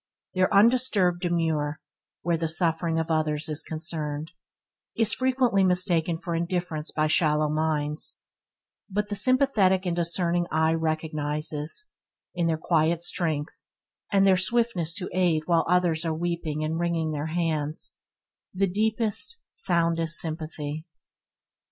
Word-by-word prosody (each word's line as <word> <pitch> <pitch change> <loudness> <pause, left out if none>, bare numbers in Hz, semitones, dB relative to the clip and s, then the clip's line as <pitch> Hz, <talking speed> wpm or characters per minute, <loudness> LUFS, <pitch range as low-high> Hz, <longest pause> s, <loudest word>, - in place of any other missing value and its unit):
Their 185 0 +2
undisturbed 205 -5 +3
demeanour, 160 -4 0 0.4
where 170 0 +1
the 165 0 -2
suffering 165 0 0
of 160 0 -1
others 155 -1 0
is 155 0 0
concerned, 155 -1 -4 0.6
is 220 -2 +3
frequently 255 -6 +2
mistaken 180 -3 +1
for 170 +1 -5
indifference 170 -2 -2
by 155 0 0
shallow 155 -1 +2
minds, 150 -1 0 0.7
but 205 +1 -2
the 205 - -2
sympathetic 210 -6 +3
and 175 -1 0
discerning 170 0 +1
eye 160 +1 +2
recognizes, 155 - -3 0.4
in 175 -1 0
their 160 -1 +1
quiet 165 0 +1
strength 160 -4 -2 0.5
and 195 -1 +4
their 190 -1 +5
swiftness 185 -5 0
to 180 - -2
aid 175 -4 +2
while 170 -1 +2
others 175 -3 +2
are 160 -2 -2
sweeping, 165 -3 -2
and 160 +2 -2
wronging 170 -2 0
their 150 0 -3
hands, 160 -2 -1 0.6
the 195 +1 +2
deepest, 220 - 0
soundest 165 -1 +1
sympathy. 155 -2 -4
165 Hz, 125 wpm, -26 LUFS, 155-185 Hz, 0.7 s, their